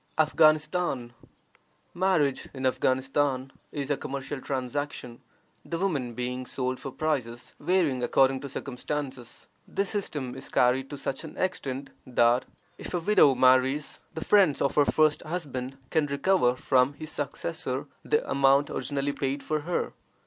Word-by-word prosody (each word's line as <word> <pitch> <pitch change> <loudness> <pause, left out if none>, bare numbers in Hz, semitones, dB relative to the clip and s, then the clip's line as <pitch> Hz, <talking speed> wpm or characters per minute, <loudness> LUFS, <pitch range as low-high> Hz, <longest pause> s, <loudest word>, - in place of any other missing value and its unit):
AFGHANISTAN. 155 -4 +2 0.8
Marriage 175 -7 +1
in 130 0 -3
Afghanistan 130 +1 +1 0.2
is 145 -1 -3
a 145 - +1
commercial 135 +1 -5
transaction, 130 -2 -4 0.4
the 165 - -4
women 145 -11 -1
being 125 +1 -3
sold 130 -1 -2
for 135 - -5
prices 125 -6 -2
varying 170 -9 +1
according 130 +2 +3
to 140 - -7
circumstances. 130 -2 -5 0.2
This 200 -1 -1
system 145 - -3
is 135 +1 -8
carried 130 +2 +2
to 145 - -6
such 135 +1 -4
an 155 - -9
extent 140 -7 -3 0.2
that 120 0 +3 0.3
if - - -5
a - - +1
widow 165 -7 +5
marries, 130 +3 +3 0.2
the 160 - -4
friends 185 -9 +5
of 140 - +1
her 145 - +4
first 155 0 +3
husband 135 -6 -4
can 155 -2 +2
recover 140 -2 +2
from 130 +1 +2
his 155 +2 -8
successor - - -3 0.2
the 450 +2 +1
amount 140 +1 +3
originally 140 +2 -2
paid 135 0 -2
for 155 0 -1
her. 170 +4 -2
140 Hz, 140 wpm, -27 LUFS, 130-155 Hz, 0.8 s, widow